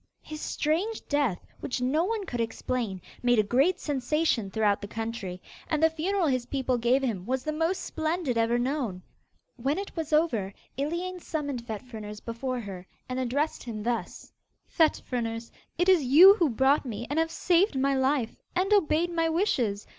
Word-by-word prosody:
His 310 0 -8
strange 360 +9 -1
death, 285 -10 0
which 250 - -3
no 265 +6 +1
one 435 -1 -2
could 245 -7 -3
explain, 225 -3 -2 0.2
made 245 -1 +3
a 215 - +5
great 275 - +2
sensation 275 -5 0
throughout 205 0 +1
the 205 - -5
country, 225 -4 -5 0.3
and 310 0 0
the 320 - +5
funeral 355 +4 0
his 255 -4 0
people 260 -2 0
gave 250 +4 +2
him 215 -8 -1
was 260 0 -1
the 310 - -1
most 325 +4 0
splendid 315 -4 -2
ever 230 +1 +2
known. 240 -8 -2 0.5
When 270 +5 0
it 395 +1 -5
was 320 -3 -4
over, 240 - +1 0.2
Iliane 340 +6 -3
summoned 285 -8 -4
Fet 220 0 -5
Fruners 215 -4 -8
before 245 +3 -4
her, 190 -3 -8 0.2
and 255 0 -3
addressed 275 +5 -1
him 220 -3 -6
thus: 235 0 -3 0.3
'Fet 320 -2 +2
Fruners! 230 -2 -3 0.3
it 355 +2 +2
is 370 -5 +5
you 320 +10 +9
who 345 -7 +2
brought 265 +4 +3
me 235 -3 -5
and 295 +3 0
have 325 0 +1
saved 350 -1 +2
my 275 +1 +2
life, 265 -3 +1 0.2
and 380 +3 +2
obeyed 345 -3 +3
my 330 -1 +1
wishes. 255 - 0
265 Hz, 175 wpm, -28 LUFS, 230-320 Hz, 0.5 s, you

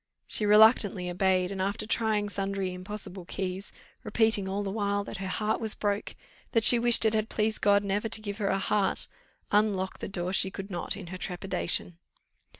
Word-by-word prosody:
She 210 - 0
reluctantly 210 -4 +5
obeyed; 185 0 +1
and, 195 -1 -4
after 200 +3 -2
trying 215 -2 0
sundry 195 -2 -3
impossible 185 0 -6
keys, 190 +1 -4 0.3
repeating 215 -3 +1
all 200 +2 -2
the 195 - -3
while 200 -1 -1
that 200 - -7
her 190 0 -5
heart 215 +4 -1
was 220 -2 +2
broke, 205 0 -2 0.4
that 225 -2 +3
she 240 +2 +9
wished 235 -1 +4
it 220 - +3
had 215 0 -1
pleased 220 0 -1
God 200 0 +4
never 205 +3 -1
to - - 0
give 205 0 -6
her 200 - -1
a 195 - +1
heart, 200 0 0 0.4
unlock 205 -3 +1
the - - -5
door 180 -1 -4
she 190 - +2
could 195 +1 -8
not 175 +2 -3
in 195 - -8
her 185 - -7
trepidation. 180 -2 -2
200 Hz, 190 wpm, -28 LUFS, 190-215 Hz, 0.4 s, she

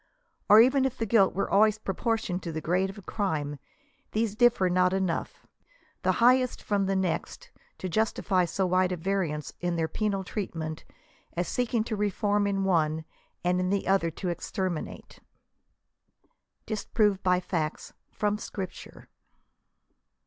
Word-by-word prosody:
Or 210 - +9
even 260 +3 +5
if 265 -1 -1
the 225 - -1
guilt 200 -3 +3
were 195 - 0
always 215 +1 +4
proportioned 215 -2 -2
to 170 - -5
the 160 - -3
grade 180 +4 0
of 195 -1 -10
crime, 150 -8 -2 0.5
these 215 -1 0
differ 240 -5 +4
not 180 +1 +3
enough, 190 -3 -2 0.6
the - - +2
highest 250 +1 +3
from 200 -2 0
the 195 - +1
next, 190 - -2 0.3
to - - -4
justify 190 -2 +1
so 190 +3 -1
wide 185 0 +2
a 180 - -2
variance 165 -5 -2
in 175 -1 -1
their 165 -1 0
penal 200 +1 -1
treatment, 165 -6 -5 0.5
as 175 +1 -2
seeking 240 -2 0
to 220 -1 -3
reform 205 0 +1
in 195 -1 0
one, 160 -4 +1 0.4
and 180 +1 +2
in 185 0 0
the 200 0 0
other 190 -3 +3
to 180 +3 -4
exterminate. 175 0 -4 1.5
DISPROVED 210 -2 0
BY 180 -1 +3
FACTS 165 -4 -3
.' - - -50
FROM 210 0 0
SCRIPTURE. 190 -3 -7
190 Hz, 150 wpm, -28 LUFS, 175-210 Hz, 1.5 s, Or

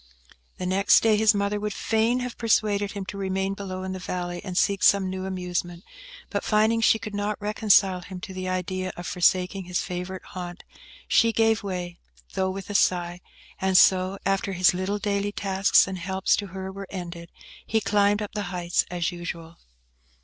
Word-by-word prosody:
The 180 - -4
next 190 +2 +4
day, 220 -1 +4
his 215 0 +4
mother 200 +1 0
would 210 0 -3
fain 230 +3 +1
have 250 -1 -5
persuaded 210 -3 +1
him 200 -2 -5
to 200 - -7
remain 190 0 -1
below 185 -2 -6
in 190 - -4
the 185 - -5
valley, 175 -1 -4
and 185 -3 -5
seek 200 -1 +2
some 195 -2 +4
new 190 0 -4
amusement, 180 -1 -4 0.5
but - - -2
finding 220 +1 +2
she 225 - +5
could 215 -1 -7
not 205 +1 -2
reconcile 205 -3 +3
him 185 0 -8
to 190 - -7
the 185 0 -4
idea 185 0 -2
of 175 - -7
forsaking 185 +1 +1
his 180 0 -1
favourite 180 +1 -5
haunt, 175 -1 -8 0.4
she 230 - +4
gave 225 -1 +2
way, 180 -3 -5 0.3
though 190 0 0
with 195 +1 -6
a - - -4
sigh; 175 -3 +1 0.4
and 190 -1 +3
so, 185 +1 +4
after 195 0 0
his 180 0 +4
little 185 +3 -2
daily 205 0 -1
tasks 195 -1 +3
and 190 -1 -5
helps 190 +2 +1
to 205 - -4
her 190 +1 -6
were 195 0 -8
ended, 170 -2 -7 0.4
he 220 - +2
climbed 205 0 +2
up 205 - -7
the 205 -1 -3
heights 175 -2 0
as 175 -1 -1
usual. 170 -1 -7
190 Hz, 185 wpm, -25 LUFS, 180-205 Hz, 0.5 s, she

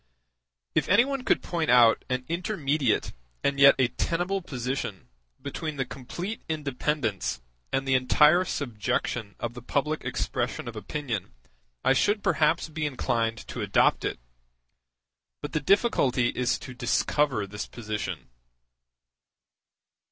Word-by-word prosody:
If - - +1
any 205 +6 +6
one 275 -2 -3
could - - +2
point 165 -3 -2
out 120 -2 +6
an 125 0 -1
intermediate 155 - 0 0.3
and 140 0 +1
yet 140 0 +8
a 130 -2 +3
tenable 175 +7 -1
position 125 - -4 0.3
between 145 +3 -5
the 135 - 0
complete 175 - -6
independence 140 - -1 0.3
and 135 0 -1
the 135 - +2
entire 150 +7 +5
subjection 120 - -2
of 120 0 -3
the 120 - -9
public 150 +5 -1
expression - - -2
of - - -6
opinion, 125 -10 -4 0.5
I - - +5
should 205 +9 +2
perhaps 160 +2 +2
be 155 -1 -2
inclined 115 -4 -1
to - - -5
adopt - - +3
it; - - -2 1.2
but 145 - -6
the 155 - +2
difficulty 140 - +3
is 125 0 0
to 130 - -9
discover 130 -2 +1
this 105 +1 -6
position. 110 -3 -5
135 Hz, 130 wpm, -27 LUFS, 120-155 Hz, 1.2 s, yet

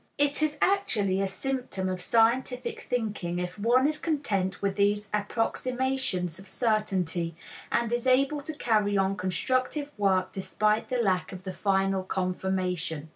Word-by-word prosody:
It 290 +1 +2
is 305 -1 +1
actually 210 - +2
a 195 - +1
symptom 245 -3 -2
of 185 -1 -3
scientific 250 - +1
thinking 210 -8 -2
if 180 +2 -4
one 245 +6 +4
is 300 0 -1
content 210 - -1
with 200 -1 -1
these 205 +1 +2
approximations 225 -3 -1
of 195 - -12
certainty 185 -8 0 0.4
and 235 0 +1
is 240 +1 -1
able 275 +3 +3
to 310 +3 -5
carry 210 -7 +2
on 195 0 +2
constructive 255 - -1
work 190 -2 +2
despite 210 +3 0
the 255 - 0
lack 190 -6 +1
of 185 -1 -8
the 185 -1 -5
final 195 -1 +1
confirmation. 180 -4 -2
205 Hz, 145 wpm, -28 LUFS, 185-255 Hz, 0.4 s, one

